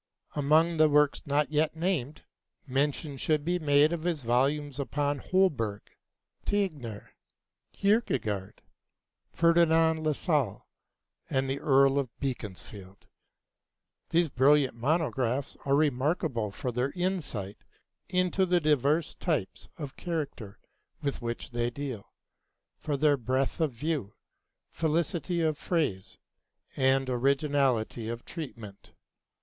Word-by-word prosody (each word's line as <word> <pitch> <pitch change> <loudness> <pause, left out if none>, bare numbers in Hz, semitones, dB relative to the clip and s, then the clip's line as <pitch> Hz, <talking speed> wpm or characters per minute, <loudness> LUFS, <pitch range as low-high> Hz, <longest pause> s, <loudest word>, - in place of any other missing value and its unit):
Among 155 +3 +3
the 155 0 +5
works 150 0 +3
not 145 +1 +1
yet 155 +1 +1
named, 160 -5 -2 0.4
mention 140 +1 -1
should 150 +2 0
be 180 +1 0
made 150 0 +4
of 170 - -3
his 165 -4 -2
volumes 140 +4 +1
upon 145 0 -1
Holberg, 130 - +1 0.6
Tegnér, 150 - -2 0.6
Kierkegaard, 130 - 0 0.7
Ferdinand 165 -1 +3
Lassalle, 150 - 0 0.6
and 135 0 0
the 135 +1 -2
Earl 135 -2 +4
of 130 -4 -5
Beaconsfield. 100 -6 -6 1.0
These 170 -1 +2
brilliant 135 +1 +4
monographs 135 -1 0
are 140 0 +3
remarkable 140 - +1
for 125 +5 -4
their 125 +3 0
insight 160 - -3 0.5
into 185 +1 +1
the 180 0 +3
diverse 150 +1 +2
types 155 - -3
of 145 -4 -7
character 145 - -4 0.5
with 140 -2 -2
which 120 +2 -4
they 120 0 0
deal, 125 -5 -6 0.7
for 145 -2 -2
their 145 0 +3
breadth 130 +4 -1
of 155 -3 +2
view, 125 -4 -3 0.6
felicity 170 +2 -1
of 155 -2 0
phrase, 145 - -2 0.6
and 135 0 +2
originality 130 -3 +1
of 115 0 -6
treatment. 115 -11 -9
145 Hz, 110 wpm, -29 LUFS, 125-160 Hz, 1.0 s, the